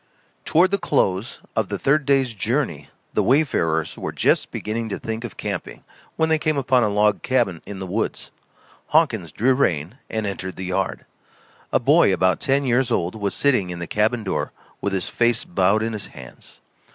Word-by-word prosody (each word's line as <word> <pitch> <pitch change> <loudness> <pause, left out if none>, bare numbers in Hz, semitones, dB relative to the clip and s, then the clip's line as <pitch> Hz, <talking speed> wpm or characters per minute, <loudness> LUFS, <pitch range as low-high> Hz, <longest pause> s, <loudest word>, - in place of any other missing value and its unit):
Toward 180 +4 +4
the 200 - +1
close 95 +4 0
of - - 0
the - - -2
third 140 +1 +1
day's 135 -4 +3
journey 105 - -2 0.2
the - - +2
wayfarers 85 - +1
were - - -3
just - - +2
beginning 110 +1 -3
to - - -3
think 110 +1 -5
of 120 - -7
camping, - - -5 0.3
when 160 - +2
they 160 -1 +2
came 155 -1 0
upon 130 -2 +3
a 105 - +2
log 105 0 +2
cabin 120 -10 0
in 100 - -6
the 95 - -5
woods. 100 +5 -3 0.6
Hawkins 115 - +2
drew 125 - +2
rein 95 - 0
and 110 -1 -2
entered 95 -2 -4
the 95 - -6
yard. 95 0 -2 0.7
A - - +3
boy - - +5
about 95 -2 +2
ten 140 +1 +1
years 130 0 +2
old 90 -6 0
was 100 -2 -2
sitting 125 -10 +2
in 90 - -5
the 85 - -4
cabin 110 +5 0
door 95 - -2 0.3
with 100 0 -1
his 95 -2 -1
face 120 -1 +1
bowed 95 +4 +2
in 115 0 -2
his 105 -2 -4
hands. 65 -3 -13
110 Hz, 190 wpm, -22 LUFS, 95-130 Hz, 0.7 s, boy